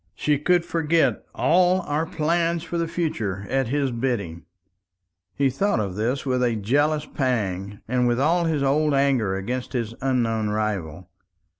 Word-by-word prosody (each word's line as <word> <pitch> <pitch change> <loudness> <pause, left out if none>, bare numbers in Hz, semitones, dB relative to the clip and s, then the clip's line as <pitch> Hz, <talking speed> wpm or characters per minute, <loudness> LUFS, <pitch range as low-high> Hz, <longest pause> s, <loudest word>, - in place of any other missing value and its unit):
"She 145 +4 +1
could 175 +3 +2
forget 165 0 +1
all 180 +2 +3
our 155 -1 -2
plans 165 +1 0
for 170 0 -3
the 165 - 0
future 110 - -2
at 135 -2 +1
his 140 +1 0
bidding." 115 -9 -3 0.9
He 135 -1 +2
thought 195 - 0
of 100 -3 -2
this 120 +8 -2
with 130 -2 0
a 120 -2 +1
jealous 145 +8 +1
pang, 100 -7 -2
and 125 +1 +1
with 120 +1 +1
all 170 +5 +2
his 155 -4 0
old 145 +2 +2
anger 130 -8 +2
against 125 +8 -4
his 115 -3 -2
unknown 115 -5 0
rival. 105 -7 -3
135 Hz, 155 wpm, -24 LUFS, 110-155 Hz, 0.9 s, all